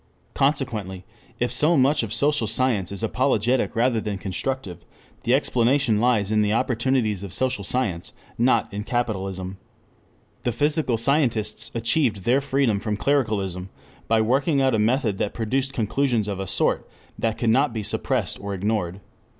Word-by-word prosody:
Consequently 110 -10 -1 0.3
if 120 - 0
so 160 +2 +3
much 135 +3 +3
of 115 -3 -5
social 145 -2 +2
science 110 -5 0
is 100 +2 -3
apologetic 125 +1 +1
rather 115 -1 +2
than 105 -2 -3
constructive, 100 0 -4 0.5
the 120 - +3
explanation 125 -3 +2
lies 115 -5 +2
in 110 0 +3
the 105 0 +1
opportunities 115 -3 0
of 100 -2 -7
social 130 -5 -1
science, 100 -6 -2 0.2
not 120 -1 +2
in 105 +1 -3
"capitalism." 95 -5 -3 0.8
The 120 - 0
physical 145 -1 +1
scientists 120 -3 0
achieved 115 - +1
their 125 +6 +3
freedom 135 -6 +1
from 105 0 -2
clericalism 105 -9 0 0.4
by 110 0 +3
working 135 +6 +2
out 135 -2 +2
a 110 - +2
method 110 -2 +1
that 105 - -2
produced 130 +4 -1
conclusions 120 -1 0
of 100 -2 -3
a 95 - -4
sort - - 0 0.3
that 115 -1 -1
could 115 -2 +1
not 135 +4 +3
be 110 -2 -4
suppressed - - -1
or 100 0 -4
ignored. 95 -2 -2
115 Hz, 155 wpm, -24 LUFS, 105-130 Hz, 0.8 s, so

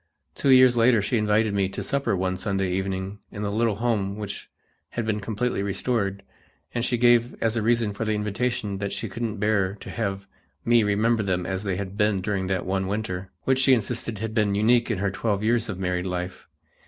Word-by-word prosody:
Two 140 - -1
years 130 -1 +7
later 120 0 +5
she 105 +4 0
invited 105 0 +2
me 100 -2 +1
to - - -5
supper 140 -6 0
one 95 0 -1
Sunday 95 -1 -1
evening 95 +1 -3
in 105 - -5
the 100 - -1
little 110 0 +1
home 105 -3 0
which 105 -2 -6 0.4
had 120 - -3
been 110 -1 0
completely 110 +2 -2
restored, 100 0 -1 0.5
and 120 - -1
she 120 -1 +1
gave 120 0 +4
as 115 0 0
a 115 - 0
reason 115 -1 +2
for 100 - -3
the 110 -1 0
invitation 105 -1 -2
that 100 0 -3
she 100 +3 -3
couldn't 110 +2 -4
bear 100 -2 +1
to - - -10
have 100 -4 -3 0.4
me 120 0 +5
remember 110 +2 +2
them 90 -3 -1
as 95 0 -2
they 100 -3 -2
had 100 +1 -5
been 105 -2 +2
during 95 -1 -2
that 95 -1 -1
one 95 0 -1
winter, 95 -2 -3
which 130 0 +2
she 130 0 +6
insisted 115 0 -3
had 110 +1 -4
been 105 -3 +2
unique 115 +4 +3
in 115 - 0
her 100 +1 0
twelve 105 0 -1
years 115 0 +1
of 100 - -4
married 90 -1 -1
life. 90 0 -5
105 Hz, 210 wpm, -25 LUFS, 95-115 Hz, 0.5 s, years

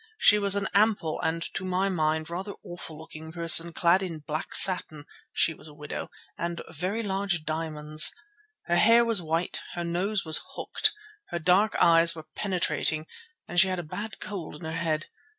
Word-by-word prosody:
She 210 - +5
was 200 -1 +3
an 200 -1 -1
ample 200 -6 +1
and, 165 +1 -2
to - - -4
my 185 +1 -1
mind, 155 -4 -1
rather 190 +4 -6
awful 175 -3 -9
looking 160 0 -11
person, 170 0 +7
clad 170 +3 +2
in 175 -4 -5
black 155 +1 -4
satin—she 160 -2 +2
was 155 - -8
a 150 - -14
widow—and 170 +3 -7
very 185 +8 -3
large 195 -4 -2
diamonds. 155 -1 +2 0.5
Her 175 0 +1
hair 230 +4 +5
was 225 -5 +2
white, 165 +1 -2
her 175 - -3
nose 185 +4 -2
was 160 -1 0
hooked, 430 - 0 0.4
her 170 - -3
dark 185 +5 +2
eyes 165 0 +4
were 160 - -10
penetrating, 175 -5 -1 0.4
and 175 - 0
she 190 - +6
had 185 -1 -2
a 175 - -4
bad 205 +7 -7
cold 190 -7 -7
in 150 - -13
her 160 - -4
head. 160 -2 -2
170 Hz, 170 wpm, -26 LUFS, 160-190 Hz, 0.5 s, person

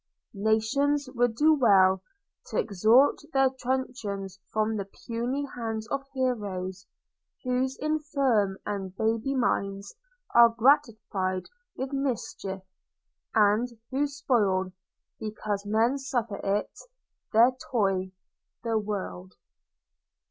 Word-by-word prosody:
Nations 225 +8 +1
would 245 -2 +1
do 310 +5 +5
well 190 -8 +5 0.5
T'extort 225 +7 +3
their 270 -1 +4
truncheons 240 -7 -3
from 215 0 0
the 200 - -3
puny 240 +7 -3
hands 225 -2 -4
Of 275 0 -3
heroes, 200 -7 -2 0.6
whose 255 +1 0
infirm 275 -10 +1
and 195 -2 -4
baby 225 +5 0
minds 200 -5 -1 0.4
Are 235 0 +8
gratified 225 -7 +1 0.3
with 265 +2 -4
mischief, 230 -8 -3 0.7
and 215 +3 +4 0.2
who 280 +3 +1
spoil, 215 -10 +1 0.5
Because 210 -1 -4
men 230 +6 +2
suffer 240 -6 -2
it, 200 +1 -1 0.6
their 235 +3 +6 0.2
toy 195 -5 +1 0.5
the 225 -2 +1
world. 200 -3 -5
225 Hz, 100 wpm, -27 LUFS, 200-260 Hz, 0.7 s, Are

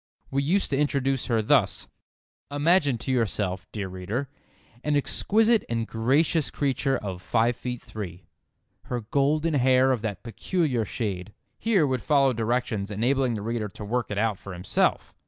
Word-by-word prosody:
We 140 +1 +1
used 175 +7 +1
to 135 - +2
introduce 135 -3 0
her 115 -3 +1
thus: 115 -4 +2 0.6
"Imagine 145 -2 +3
to 125 +4 -4
yourself, 100 -6 -1
dear 100 -3 -4
reader, 95 +9 -4 0.5
an 150 -1 +1
exquisite 220 - +3
and 115 -1 -1
gracious 140 +8 +1
creature 135 -1 0
of 95 -3 -6
five 115 +5 +1
feet 125 0 -5
three. 100 -6 -7 0.6
Her 120 -1 -3
golden 145 +7 +1
hair 130 -1 +4
of 125 -4 0
that 105 -5 -4
peculiar 125 - -1
shade"—here 110 - -2
would 130 -3 -1
follow 140 -1 +3
directions 115 -3 -1
enabling 125 +4 +1
the 105 - -5
reader 115 -1 -2
to 105 +2 -9
work 120 +2 -1
it 105 - -3
out 105 -2 0
for 100 - -8
himself. 90 +1 0
125 Hz, 155 wpm, -26 LUFS, 105-140 Hz, 0.6 s, hair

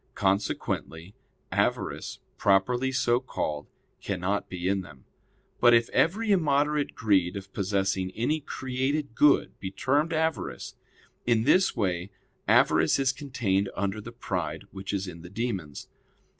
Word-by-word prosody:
Consequently 95 -2 -1 0.4
avarice - - -1 0.2
properly 120 +7 +2
so 120 -2 +2
called 75 - -4 0.3
cannot 100 +1 -2
be 90 -1 -3
in 95 0 +1
them. 70 -8 -14 0.5
But 120 -1 +7
if 115 0 +2
every 210 +7 +2
immoderate 150 -4 +2
greed 95 -5 +2
of 95 -1 -8
possessing 95 -1 0
any 150 +8 0
created 135 0 -2
good 145 +4 +3
be 95 - -4
termed 145 - +1
avarice, 160 -1 -2 0.5
in 115 -2 +3
this 185 +9 +4
way 95 -5 -1 0.4
avarice - - +4
is 135 -1 +2
contained 115 -9 -1
under 100 +1 -2
the 115 - -9
pride 120 - -4
which 95 0 -6
is 100 -1 -2
in 85 -2 -8
the 90 - -10
demons. 100 - -4
110 Hz, 130 wpm, -27 LUFS, 95-135 Hz, 0.5 s, But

